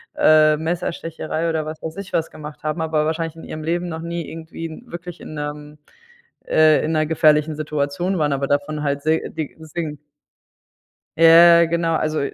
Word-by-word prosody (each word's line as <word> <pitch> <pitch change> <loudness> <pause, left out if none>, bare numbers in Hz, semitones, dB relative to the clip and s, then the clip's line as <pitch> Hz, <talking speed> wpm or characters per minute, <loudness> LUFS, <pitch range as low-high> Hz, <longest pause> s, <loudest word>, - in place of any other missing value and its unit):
äh, 155 0 +5
Messerstecherei 165 0 -3
oder 160 -1 -1
was 155 0 -7
weiß 160 +3 -6
ich 200 -1 -8
was 165 - 0
gemacht 150 -1 -10
haben, 155 +2 -2
aber 155 -1 0
wahrscheinlich 160 0 -2
in 165 - -11
ihrem 155 0 -7
Leben 175 +2 -1
noch 160 0 -5
nie 170 -1 -5
irgendwie 165 +3 -8
wirklich 175 -5 -9
in - - -9
'nem 150 0 -6 0.7
äh, 155 -1 +4
in 160 - -1
'ner 155 0 +2
gefährlichen 155 -1 +3
Situation 150 +4 -2
waren, 150 -1 +1
aber 140 0 -1
davon 145 +2 -1
halt 140 -1 -1
se 160 +1 +2
die 160 -3 -5
singen. 155 -1 -5 1.2
Ja, 170 +1 +8
ja - - +5
genau. 165 0 0
Also, 155 0 -1
160 Hz, 175 wpm, -21 LUFS, 150-165 Hz, 1.2 s, Ja